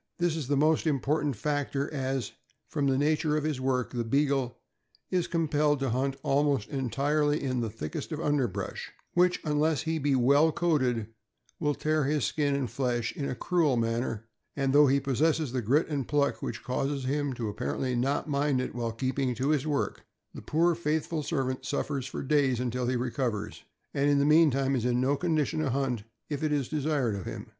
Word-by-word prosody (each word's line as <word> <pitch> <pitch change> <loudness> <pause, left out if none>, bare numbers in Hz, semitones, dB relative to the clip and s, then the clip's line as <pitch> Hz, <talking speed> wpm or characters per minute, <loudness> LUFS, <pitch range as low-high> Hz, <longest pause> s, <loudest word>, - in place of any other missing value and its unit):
This 175 -2 +1
is 150 -5 -4
a 145 - +3
most 155 +3 +3
important 145 0 0
factor, 145 +2 -1
as, 135 -4 -2 0.4
from 145 -3 -1
the 135 -1 +2
nature 150 +1 +2
of 150 - -1
his 150 -4 -2
work, 130 -1 0
the 120 -1 -1
Beagle 135 0 +1 0.5
is 180 -2 +1
compelled 150 -3 +1
to 135 -3 0
hunt 135 +3 0
almost 140 -5 +1
entirely 145 +3 0
in 130 -2 -1
the 115 - -2
thickest 105 - -6
of 155 - -3
underbrush, 130 - -1 0.2
which, 180 0 +3
unless 150 -1 +1
he 160 0 -1
be 140 -1 +2
well 140 +5 +4
coated, 130 -10 +1 0.5
will 150 -3 0
tear 155 -1 +1
his 145 -1 +1
skin 145 -2 0
and 135 -4 -2
flesh 120 -3 -1
in 140 - -3
a - - -3
cruel 155 -4 +1
manner; 115 -1 -1 0.3
and 135 -1 0
though 145 0 +7
he 140 +1 +3
possess 140 +4 +2
the 130 -1 -1
grit 135 +9 +2
and 140 -5 -2
pluck 145 -1 +1
which - - -5
causes 135 +2 -2
him 145 +1 0
to 115 -4 -3
appar 70 -6 -3
ently 125 -2 -1
not 135 +6 0
mind 140 -2 +1
it 130 - -3
while 120 -1 -2
keeping 130 +2 -1
to 130 +4 -1
his 150 -1 +1
work, 145 -2 -1 0.3
the - - -8
poor 170 +3 +2
faithful 160 0 -1
servant 130 -4 -2
suffers 135 0 -2
for - - -5
days 135 -3 +2
until 125 0 -1
he 125 - +1
recovers, 120 -5 -3 0.3
and 140 +1 +2
in 145 - +4
the 140 - +3
meantime 140 -3 +4
is 120 - -1
in 125 0 +1
no 135 +3 +2
condition 155 -2 0
to 155 -3 0
hunt 125 -4 -1 0.2
if 145 -2 -4
it 155 - +1
be 145 -2 +1
desired 145 -6 0
of 100 -2 -5
him. - - -6
140 Hz, 195 wpm, -29 LUFS, 125-150 Hz, 0.5 s, though